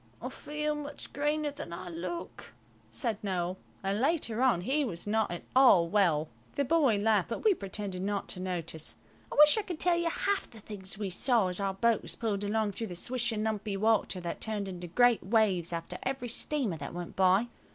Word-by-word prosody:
"I -, -, -5 dB
feel 300 Hz, 0 st, -3 dB
much 295 Hz, -1 st, -7 dB
greener 295 Hz, +1 st, 0 dB
than 285 Hz, -, -8 dB
I 170 Hz, +2 st, -6 dB
look," 175 Hz, -6 st, -6 dB, 0.4 s
said 155 Hz, -, -2 dB
Noël. 185 Hz, -2 st, -2 dB, 0.3 s
And 200 Hz, +3 st, 0 dB
later 265 Hz, -6 st, +1 dB
on 245 Hz, -9 st, +3 dB
he 275 Hz, +9 st, +1 dB
was 175 Hz, -10 st, -5 dB
not 220 Hz, +1 st, +1 dB
at 175 Hz, 0 st, -5 dB
all 225 Hz, -11 st, +7 dB
well. 170 Hz, -7 st, +3 dB, 0.3 s
The 280 Hz, -, +1 dB
boy 275 Hz, -7 st, +3 dB
laughed, 210 Hz, -2 st, +2 dB
but 230 Hz, -, -4 dB
we 435 Hz, -2 st, +5 dB
pretended 195 Hz, -, -5 dB
not 200 Hz, +1 st, -2 dB
to 180 Hz, -, -1 dB
notice. 170 Hz, -4 st, -3 dB, 0.4 s
I -, -, -4 dB
wish 300 Hz, +7 st, +7 dB
I -, -, +1 dB
could 355 Hz, -5 st, -6 dB
tell 350 Hz, -1 st, +3 dB
you 340 Hz, -1 st, +1 dB
half 395 Hz, +4 st, -1 dB
the 225 Hz, -, -13 dB
things 195 Hz, -2 st, -7 dB
we 200 Hz, -2 st, -3 dB
saw 220 Hz, 0 st, +3 dB
as 180 Hz, -, -3 dB
our 195 Hz, -1 st, -1 dB
boat 230 Hz, +2 st, +2 dB
was -, -, -6 dB
pulled 210 Hz, -3 st, -2 dB
along 210 Hz, 0 st, 0 dB
through 225 Hz, +3 st, -4 dB
the 180 Hz, -, -7 dB
swishing, 235 Hz, +1 st, +1 dB
lumpy 210 Hz, -2 st, -2 dB
water 215 Hz, -2 st, +2 dB
that 170 Hz, -, -5 dB
turned 210 Hz, -3 st, -2 dB
into 180 Hz, -2 st, -6 dB
great 245 Hz, +6 st, +4 dB
waves 195 Hz, -5 st, +2 dB
after 165 Hz, -1 st, -4 dB
every 265 Hz, -2 st, -3 dB
steamer 240 Hz, -, -1 dB
that 145 Hz, +3 st, -7 dB
went 175 Hz, 0 st, -6 dB
by. 190 Hz, +4 st, +4 dB
210 Hz, 205 wpm, -30 LUFS, 185-255 Hz, 0.4 s, all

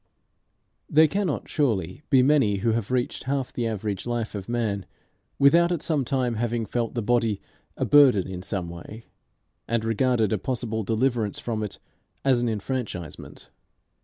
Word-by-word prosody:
There 155 Hz, +1 st, +6 dB
cannot 185 Hz, -2 st, -2 dB
surely 105 Hz, -, -1 dB
be 130 Hz, -3 st, +5 dB
many 135 Hz, -7 st, +4 dB
who 115 Hz, -, +4 dB
have 110 Hz, -2 st, -1 dB
reached 125 Hz, 0 st, -1 dB
half 135 Hz, -1 st, -2 dB
the 120 Hz, -2 st, -1 dB
average 105 Hz, -1 st, -3 dB
life 120 Hz, -2 st, -2 dB
of 100 Hz, 0 st, -6 dB
man 105 Hz, -6 st, -1 dB, 0.5 s
without 170 Hz, +5 st, +5 dB
at 170 Hz, -3 st, -1 dB
some 150 Hz, -4 st, +1 dB
time 125 Hz, -3 st, 0 dB
having 120 Hz, 0 st, -1 dB
felt 115 Hz, +3 st, -2 dB
the 120 Hz, -, -1 dB
body 115 Hz, -2 st, +1 dB, 0.4 s
a -, -, 0 dB
burden 135 Hz, -10 st, +6 dB
in 95 Hz, -1 st, -6 dB
some 95 Hz, -2 st, -3 dB
way, 85 Hz, +7 st, -10 dB, 0.6 s
and 115 Hz, -1 st, 0 dB
regarded 115 Hz, -1 st, +2 dB
a 105 Hz, -, 0 dB
possible 115 Hz, -1 st, -2 dB
deliverance 115 Hz, 0 st, 0 dB
from 110 Hz, -2 st, -3 dB
it 105 Hz, -2 st, -5 dB, 0.5 s
as 130 Hz, -3 st, +4 dB
an 120 Hz, -, +1 dB
enfranchisement. 105 Hz, -, -5 dB
115 Hz, 160 wpm, -25 LUFS, 105-130 Hz, 0.6 s, There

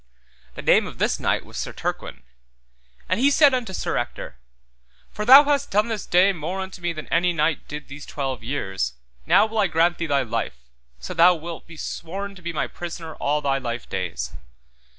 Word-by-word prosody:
The -, -, -7 dB
name -, -, +4 dB
of -, -, -10 dB
this -, -, 0 dB
knight -, -, 0 dB
was -, -, -10 dB
Sir -, -, -4 dB
Turquine. 65 Hz, -, -5 dB, 0.8 s
Then 185 Hz, +4 st, 0 dB
he 275 Hz, +3 st, +5 dB
said 285 Hz, -1 st, +5 dB
unto 245 Hz, -6 st, -1 dB
Sir 185 Hz, -, -2 dB
Ector, -, -, -5 dB, 0.7 s
For 210 Hz, -, -4 dB
thou 270 Hz, +5 st, +10 dB
hast 285 Hz, -1 st, 0 dB
done 210 Hz, +3 st, +2 dB
this 220 Hz, -4 st, -4 dB
day 185 Hz, +3 st, +4 dB
more 175 Hz, +3 st, -4 dB
unto 190 Hz, -1 st, -6 dB
me 175 Hz, 0 st, -1 dB
than 155 Hz, -2 st, -7 dB
any 175 Hz, +1 st, +2 dB
knight 155 Hz, -1 st, 0 dB
did 150 Hz, +1 st, -7 dB
these 140 Hz, +1 st, -10 dB
twelve 135 Hz, -5 st, -4 dB
years, 95 Hz, -, -2 dB, 0.3 s
now 205 Hz, -, +6 dB
will 220 Hz, 0 st, -3 dB
I 200 Hz, -, +4 dB
grant 170 Hz, +1 st, +2 dB
thee 170 Hz, -, -2 dB
thy 140 Hz, -2 st, +2 dB
life, 115 Hz, -, -3 dB, 0.4 s
so -, -, -7 dB
thou 180 Hz, +1 st, +6 dB
wilt 165 Hz, +1 st, -8 dB
be 165 Hz, -1 st, -12 dB
sworn 195 Hz, +6 st, -5 dB
to 190 Hz, -, -14 dB
be 170 Hz, 0 st, -4 dB
my 155 Hz, -, -1 dB
prisoner 165 Hz, -2 st, -7 dB
all 150 Hz, +1 st, 0 dB
thy 135 Hz, -1 st, 0 dB
life 120 Hz, -2 st, -5 dB
days. 80 Hz, -10 st, -4 dB
170 Hz, 200 wpm, -23 LUFS, 140-195 Hz, 0.8 s, thou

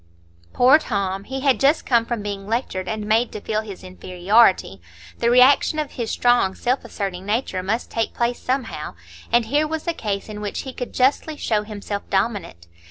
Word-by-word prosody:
Poor 260 Hz, +5 st, +6 dB
Tom! 200 Hz, -7 st, -2 dB
he 265 Hz, +1 st, -5 dB
had 270 Hz, -2 st, +3 dB
just 285 Hz, +4 st, +3 dB
come 235 Hz, -2 st, +2 dB
from 235 Hz, -4 st, -3 dB
being 200 Hz, -1 st, -5 dB
lectured 215 Hz, -5 st, -2 dB
and 215 Hz, -1 st, -3 dB
made 225 Hz, +3 st, +2 dB
to -, -, -6 dB
feel 215 Hz, +1 st, -2 dB
his 205 Hz, -4 st, -10 dB
inferiority; 185 Hz, -, +2 dB, 0.4 s
the 235 Hz, -, +2 dB
reaction 255 Hz, +5 st, +5 dB
of 300 Hz, -2 st, -2 dB
his 235 Hz, -3 st, -4 dB
strong, 240 Hz, -6 st, +2 dB
self 255 Hz, +2 st, -1 dB
asserting 190 Hz, -3 st, -5 dB
nature 205 Hz, -2 st, -1 dB
must 215 Hz, +6 st, -2 dB
take 225 Hz, -1 st, -2 dB
place 240 Hz, 0 st, 0 dB
somehow; 255 Hz, -2 st, -3 dB, 0.4 s
and 235 Hz, -1 st, +3 dB
here 295 Hz, +6 st, +1 dB
was 320 Hz, +2 st, -4 dB
a 340 Hz, -, +1 dB
case 205 Hz, -9 st, -3 dB
in 210 Hz, -1 st, -7 dB
which 205 Hz, -1 st, -3 dB
he 265 Hz, -, -8 dB
could 245 Hz, -, -6 dB
justly 280 Hz, +4 st, +1 dB
show 215 Hz, -6 st, 0 dB
himself 205 Hz, -1 st, -5 dB
dominant. 190 Hz, -, -2 dB
225 Hz, 185 wpm, -22 LUFS, 200-250 Hz, 0.4 s, Poor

